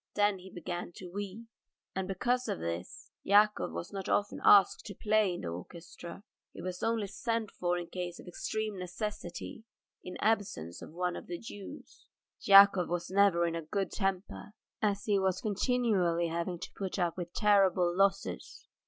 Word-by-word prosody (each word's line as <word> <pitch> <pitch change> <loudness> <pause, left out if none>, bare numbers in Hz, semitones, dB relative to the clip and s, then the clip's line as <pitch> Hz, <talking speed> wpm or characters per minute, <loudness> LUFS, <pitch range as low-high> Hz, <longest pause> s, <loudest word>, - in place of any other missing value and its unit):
Then 205 -2 +2
he 185 +1 -11
began 175 0 -5
to 180 -2 -9
weep. 205 +3 -5 0.5
And 190 0 -2
because 245 +7 0
of - - -1
this 85 +2 -6
Yakov 210 - +4
was 85 +1 -6
not 195 -1 -4
often 205 0 0
asked 200 -3 +6
to 200 - -7
play 215 -1 +2
in - - -6
the 85 - -4
orchestra; 170 - -9 0.3
he - - -11
was 180 0 -5
only 225 -2 0
sent 225 +2 -2
for 175 0 -1
in 175 - -4
case 175 0 -5
of - - -11
extreme 215 +3 -3
necessity 210 +5 -5 0.4
in 180 - -7
the - - -6
absence 200 - 0
of - - -9
one 180 +1 -2
of - - -8
the 175 - -4
Jews. 205 -1 -11 0.3
Yakov 195 -2 +7
was 175 +1 -3
never 190 -3 +4
in 170 - -1
a 165 - -2
good 195 +5 -2
temper, 195 +1 -3 0.3
as 205 -1 +1
he 205 -2 +2
was 190 -1 +1
continually 200 -6 +1
having 170 +2 -2
to - - -8
put 195 -1 -4
up 175 -3 0
with 175 -2 -5
terrible 190 -4 +3
losses. 195 +1 0
190 Hz, 175 wpm, -31 LUFS, 175-205 Hz, 0.5 s, Yakov